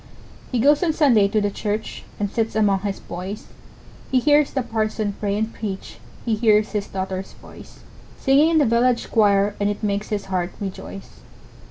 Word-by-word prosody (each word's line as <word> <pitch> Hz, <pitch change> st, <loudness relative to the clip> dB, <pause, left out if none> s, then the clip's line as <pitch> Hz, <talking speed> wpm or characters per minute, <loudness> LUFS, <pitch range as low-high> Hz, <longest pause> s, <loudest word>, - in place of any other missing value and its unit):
He 250 Hz, -, 0 dB
goes 285 Hz, +5 st, +4 dB
on 335 Hz, -3 st, +2 dB
Sunday 245 Hz, -11 st, +4 dB
to 215 Hz, +2 st, +1 dB
the 205 Hz, -1 st, 0 dB
church, 210 Hz, +2 st, -4 dB, 0.2 s
And 205 Hz, -, 0 dB
sits 225 Hz, -1 st, -1 dB
among 205 Hz, -3 st, +3 dB
his 200 Hz, 0 st, -4 dB
boys; 185 Hz, +4 st, -7 dB, 0.6 s
He 260 Hz, -, +3 dB
hears 290 Hz, +2 st, +4 dB
the 265 Hz, -, -2 dB
parson 215 Hz, -2 st, -2 dB
pray 200 Hz, -1 st, -1 dB
and 220 Hz, +1 st, -2 dB
preach, 200 Hz, -3 st, -6 dB, 0.3 s
He 230 Hz, -, +1 dB
hears 215 Hz, -1 st, +3 dB
his 210 Hz, -2 st, -2 dB
daughter's 190 Hz, 0 st, -5 dB
voice, -, -, -15 dB, 0.4 s
Singing 285 Hz, +4 st, +4 dB
in 330 Hz, -, +3 dB
the 295 Hz, -, +4 dB
village 235 Hz, +1 st, +1 dB
choir, 205 Hz, -1 st, +3 dB
And 205 Hz, 0 st, +1 dB
it 205 Hz, +1 st, -4 dB
makes 205 Hz, 0 st, -1 dB
his 205 Hz, -2 st, -2 dB
heart 180 Hz, -2 st, -2 dB
rejoice. 195 Hz, 0 st, -8 dB
215 Hz, 180 wpm, -22 LUFS, 200-235 Hz, 0.6 s, goes